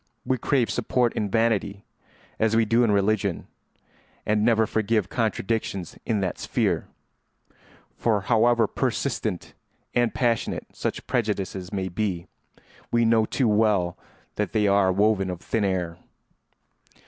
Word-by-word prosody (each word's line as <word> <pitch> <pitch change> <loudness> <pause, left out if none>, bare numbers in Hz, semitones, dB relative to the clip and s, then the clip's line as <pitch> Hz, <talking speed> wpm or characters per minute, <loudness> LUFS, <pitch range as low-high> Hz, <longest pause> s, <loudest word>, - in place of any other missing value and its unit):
We 130 -1 0
crave 130 -1 +1
support 125 0 +1
in 105 - -2
vanity, 105 -2 0 0.5
as 110 0 +2
we 115 0 +4
do 115 +3 +3
in 115 - +2
religion, 100 -2 +1 0.8
and 105 0 +1
never 110 -1 +4
forgive 110 -2 0
contradictions 110 -4 -2
in 110 -4 +1
that 95 -2 -2
sphere; - - 0 1.1
for 110 -4 +1
however 115 +2 +3
persistent - - -2 0.4
and 120 -1 +2
passionate 120 -3 -1
such - - -4
prejudices 100 -5 -2
may 95 -2 -2
be, 95 -2 -2 0.7
we 120 0 +3
know 115 -1 +4
too 130 - +1
well 105 -5 +2 0.4
that 105 -3 -2
they 110 -2 +2
are 100 -1 +4
woven 100 0 +2
of 90 -2 -4
thin 110 - -1
air. 90 -3 -1
105 Hz, 130 wpm, -25 LUFS, 95-115 Hz, 1.1 s, we